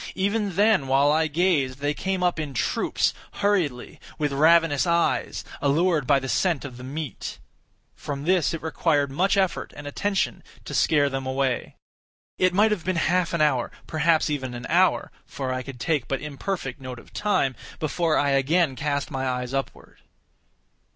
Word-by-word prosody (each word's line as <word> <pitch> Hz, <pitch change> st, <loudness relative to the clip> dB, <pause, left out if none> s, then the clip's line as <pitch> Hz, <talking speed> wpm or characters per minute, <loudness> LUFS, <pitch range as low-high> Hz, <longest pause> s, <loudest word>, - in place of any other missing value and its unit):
Even 200 Hz, -1 st, 0 dB
then, 205 Hz, -8 st, +3 dB
while 135 Hz, +2 st, +4 dB
I 160 Hz, +1 st, +2 dB
gazed, 150 Hz, -5 st, +1 dB
they 145 Hz, +1 st, -1 dB
came 190 Hz, +3 st, -2 dB
up 175 Hz, -2 st, +1 dB
in 145 Hz, -3 st, -4 dB
troops, -, -, 0 dB, 0.2 s
hurriedly, 180 Hz, -12 st, -1 dB, 0.2 s
with 150 Hz, -2 st, 0 dB
ravenous 160 Hz, +1 st, +4 dB
eyes, 170 Hz, 0 st, +1 dB, 0.2 s
allured 150 Hz, 0 st, +2 dB
by 145 Hz, -, +5 dB
the 135 Hz, -1 st, -3 dB
scent 165 Hz, +1 st, 0 dB
of 130 Hz, -3 st, -8 dB
the 125 Hz, -, -10 dB
meat. 140 Hz, -2 st, -5 dB, 0.6 s
From 140 Hz, -1 st, -5 dB
this 180 Hz, -1 st, +2 dB
it 165 Hz, -2 st, -5 dB
required 150 Hz, -3 st, +1 dB
much 190 Hz, +8 st, +1 dB
effort 190 Hz, -2 st, 0 dB
and 145 Hz, -, -8 dB
attention 195 Hz, +7 st, -1 dB, 0.2 s
to -, -, -7 dB
scare 145 Hz, -2 st, +3 dB
them 135 Hz, -1 st, -3 dB
away. 130 Hz, -2 st, -1 dB, 0.6 s
It 185 Hz, 0 st, +4 dB
might 210 Hz, +4 st, +3 dB
have 200 Hz, -6 st, -1 dB
been 185 Hz, +1 st, -1 dB
half 175 Hz, +1 st, +1 dB
an 170 Hz, -, 0 dB
hour, 135 Hz, -5 st, +2 dB, 0.2 s
perhaps 160 Hz, 0 st, +2 dB
even 130 Hz, -4 st, -3 dB
an 120 Hz, +1 st, -7 dB
hour, 180 Hz, +3 st, +3 dB, 0.2 s
(for 130 Hz, -2 st, -4 dB
I 130 Hz, -, -2 dB
could 130 Hz, -1 st, -9 dB
take 145 Hz, -3 st, 0 dB
but 135 Hz, -, -1 dB
imperfect 150 Hz, -2 st, -5 dB
note 130 Hz, -1 st, -7 dB
of 120 Hz, -, -15 dB
time) 140 Hz, -11 st, +1 dB, 0.2 s
before 160 Hz, +1 st, 0 dB
I 140 Hz, -1 st, +2 dB
again 140 Hz, +2 st, +2 dB
cast 145 Hz, +2 st, -2 dB
my 135 Hz, -1 st, -2 dB
eyes 125 Hz, 0 st, -3 dB
upward. 135 Hz, 0 st, -5 dB
150 Hz, 170 wpm, -25 LUFS, 135-175 Hz, 0.6 s, by